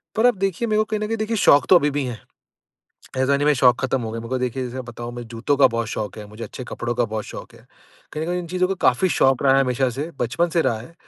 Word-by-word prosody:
पर 220 +2 +2
आप 245 - +3
देखिए 195 +4 -1
मेरे 215 -1 +1
को 215 - +4
कहीं 215 -1 -2
न 210 - -2
कहीं 225 - -2
देखिए 220 +1 -2
शौक 145 -7 +5
तो - - +8
अभी 150 -4 +4
भी 145 0 -1
हैं, 120 -3 -5 1.0
ऐसा 130 +2 +2
नहीं 145 - -1
मेरे 150 - +5
शौक 125 -2 +4
ख़त्म 130 0 0
हो 110 - -4
गए 115 - -4
मगर 120 +3 -3
देखिए 125 +1 -2
जैसे 125 +1 -5
बताऊँ 120 0 -7
मुझे 120 -1 -7
जूतों 115 +5 -1
का 140 - +6
बहुत 115 0 -1
शौक 110 -1 -4
है 105 - -7
मुझे 105 +2 -10
अच्छे 125 +4 -8
कपड़ों 120 0 -3
का 120 0 +1
बहुत 110 -1 -4
शौक - - -10
है, - - -19 0.5
कहीं 155 - -4
न - - -3
कहीं 180 +1 -1
इन 175 - -5
चीज़ों 185 +2 0
को 195 - 0
काफ़ी 155 +9 +3
शौक 135 -2 +3
रहा 135 -1 +5
है 135 - +5
हमेशा 130 0 +1
से, 145 +7 -5
बचपन 125 +9 0
से 170 0 +1
रहा 120 -6 0
है। 125 +10 -12
135 Hz, 295 wpm, -22 LUFS, 120-175 Hz, 1.0 s, तो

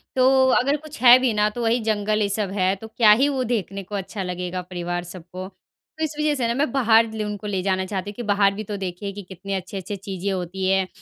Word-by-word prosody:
तो 260 0 +5
अगर 280 +4 +1
कुछ 305 -3 -12
है 245 0 +9
भी 255 -2 +2
ना, 210 0 +2
तो 240 +3 -6
वही 230 +2 +2
जंगल, 215 0 0
ये 205 - +1
सब 200 -1 -2
है, 190 -1 +1
तो 220 +3 -10
क्या 220 -1 +4
ही 250 +7 +5
वो 265 -2 -1
देखने 200 -4 -2
को 205 +3 -7
अच्छा 195 +1 -4
लगेगा 180 0 -4
परिवार 175 -1 -4
सब 175 0 -10
को। 185 +1 -5
तो 315 - -12
इस 305 -1 -2
वजह 300 -1 +2
से 250 -4 0
ना, 230 - 0
मैं 275 +1 0
बाहर 230 -3 +4
लु 215 -1 -3
उनको 210 0 -5
ले 195 -2 -1
जाना 190 0 0
चाहती 195 +1 -4
हूँ - - -17
कि 240 - -5
बाहर 200 -2 +3
भी 210 +2 -5
तो 205 0 -5
देखिए 190 +1 -5
कि 205 - -7
कितनी 195 +1 -6
अच्छी-अच्छी 190 +1 -4
चीज़ें 195 0 -4
होती 185 +1 -3
हैं, 190 -1 +2
205 Hz, 255 wpm, -23 LUFS, 190-230 Hz, -, है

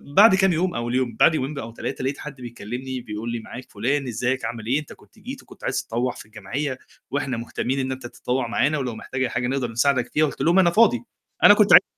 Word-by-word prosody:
بعد 200 -1 +8
كام 190 -2 +3
يوم 180 +3 0
أول 120 +1 -2
يوم 125 -4 0
بعد 160 - +6
يومين 140 +1 -2
أو 115 -2 -6
3 120 - -5
لقيت 135 +2 -1
حد 150 -2 -7
بيكلمني 125 +2 -6
بيقول 110 +2 -5
لي: 120 - -2
"معاك 125 +3 -10
فلان 130 +6 -1
إزيك 125 +3 -1
عامل 115 -2 -5
إيه؟ 135 +5 +2
أنت 150 - -10
كنت - - -21
جيت - - -8
وكنت - - -17
عايز - - -1
تطوّع 120 +2 -1
في - - -11
الجمعية، 125 +6 -4 0.3
وإحنا 135 -4 -1
مهتمين 125 +3 -2
إن 130 0 -1
أنت 130 -2 -5
تتطوّع 125 0 -2
معانا 140 +6 +1
ولو 125 -5 -3
محتاج 130 +3 -5
أي - - 0
حاجة 125 - -1
نقدر 130 -3 -1
نساعدك 130 +1 +1
فيها." 155 +1 +4
قُلت 145 - -5
لهم 175 +4 +4
أنا 175 -2 +5
فاضي 175 - +4 0.4
أنا - - +10
كنت - - +5
عايز - - +10
130 Hz, 235 wpm, -23 LUFS, 120-140 Hz, 0.4 s, أنا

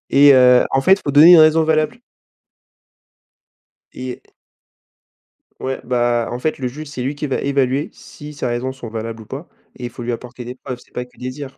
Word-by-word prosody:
Et 140 0 +7
heu, 125 -1 +6
en 135 - +1
fait, 190 +8 +5
il 200 - -10
faut 145 - -1
donner 155 +5 +8
une 170 - +9
raison 155 +1 +5
valable. 155 -1 0 2.0
Et 130 -1 -7 1.4
Ouais, 130 0 -3
bah, 120 -1 0
en 120 - -4
fait, 155 +4 -2
le 130 -2 -3
juge, 150 +4 -8
c'est 130 -4 -6
lui 135 +3 -3
qui 150 0 -4
va 135 - -1
évaluer 140 0 0
si 150 +1 -12
ces 140 - -5
raisons 125 +2 -2
sont 125 -3 -9
valables 115 0 -6
ou - - -13
pas. 140 +9 -8 0.3
Et 125 - -7
il - - -4
faut 120 0 -9
lui 120 - -3
apporter 120 +1 -7
des 125 +1 -8
preuves, 125 -1 -8
c'est - - -22
pas 125 - -5
que 125 - -26
des 125 0 -5
dires. 135 0 -9
130 Hz, 215 wpm, -18 LUFS, 125-145 Hz, 2.0 s, une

